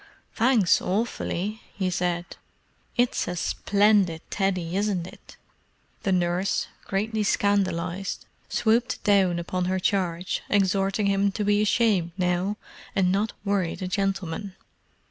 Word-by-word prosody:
"Thanks, 225 Hz, -6 st, +3 dB
awfully," 210 Hz, 0 st, -2 dB, 0.2 s
he 190 Hz, -2 st, 0 dB
said. 175 Hz, -1 st, -1 dB, 0.7 s
"It's 245 Hz, 0 st, +1 dB
a 180 Hz, -, -2 dB
splendid 200 Hz, -2 st, +2 dB
Teddy, 185 Hz, -3 st, -1 dB
isn't 200 Hz, -4 st, 0 dB
it?" -, -, -14 dB, 0.6 s
The 195 Hz, -, 0 dB
nurse, 180 Hz, +1 st, +1 dB, 0.2 s
greatly 215 Hz, +3 st, -1 dB
scandalized, 195 Hz, -3 st, 0 dB, 0.2 s
swooped 230 Hz, +2 st, +1 dB
down 195 Hz, -4 st, +3 dB
upon 180 Hz, +1 st, -2 dB
her 185 Hz, +1 st, 0 dB
charge, 180 Hz, -2 st, -1 dB
exhorting 195 Hz, +1 st, +2 dB
him 200 Hz, 0 st, +2 dB
to 210 Hz, -, -2 dB
be 205 Hz, 0 st, +3 dB
ashamed, 205 Hz, -6 st, +2 dB
now, 180 Hz, +3 st, 0 dB, 0.4 s
and 185 Hz, -2 st, +3 dB
not 205 Hz, +3 st, 0 dB
worry 195 Hz, -4 st, 0 dB
the 185 Hz, -, -5 dB
gentleman. 195 Hz, 0 st, -2 dB
195 Hz, 120 wpm, -25 LUFS, 180-205 Hz, 0.7 s, Thanks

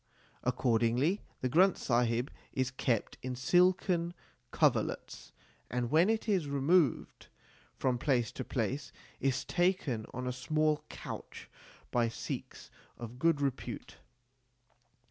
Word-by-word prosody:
Accord 125 Hz, -2 st, +2 dB
ingly 130 Hz, -, +2 dB, 0.2 s
the 130 Hz, -, +1 dB
Granth 185 Hz, +7 st, +5 dB
Sahib 120 Hz, +1 st, +1 dB, 0.2 s
is 130 Hz, -1 st, 0 dB
kept 125 Hz, -4 st, -1 dB
in 130 Hz, 0 st, -4 dB
silken 175 Hz, +4 st, +2 dB, 0.4 s
coverlets, -, -, 0 dB, 0.4 s
and 120 Hz, 0 st, -2 dB
when 165 Hz, +6 st, +5 dB
it 225 Hz, 0 st, 0 dB
is 190 Hz, -8 st, +1 dB
removed 140 Hz, +1 st, +2 dB, 0.5 s
from 125 Hz, -2 st, 0 dB
place 120 Hz, -5 st, +1 dB
to -, -, -5 dB
place 130 Hz, +3 st, -2 dB, 0.3 s
is 135 Hz, +1 st, 0 dB
taken 175 Hz, -, 0 dB
on 125 Hz, +1 st, -5 dB
a 125 Hz, -, -1 dB
small 155 Hz, +4 st, +1 dB
couch -, -, -8 dB, 0.4 s
by 120 Hz, -1 st, +2 dB
Sikhs 115 Hz, -, -6 dB, 0.3 s
of 120 Hz, +1 st, -8 dB
good 165 Hz, -1 st, +3 dB
repute. 135 Hz, -2 st, -3 dB
135 Hz, 120 wpm, -32 LUFS, 125-165 Hz, 0.5 s, Granth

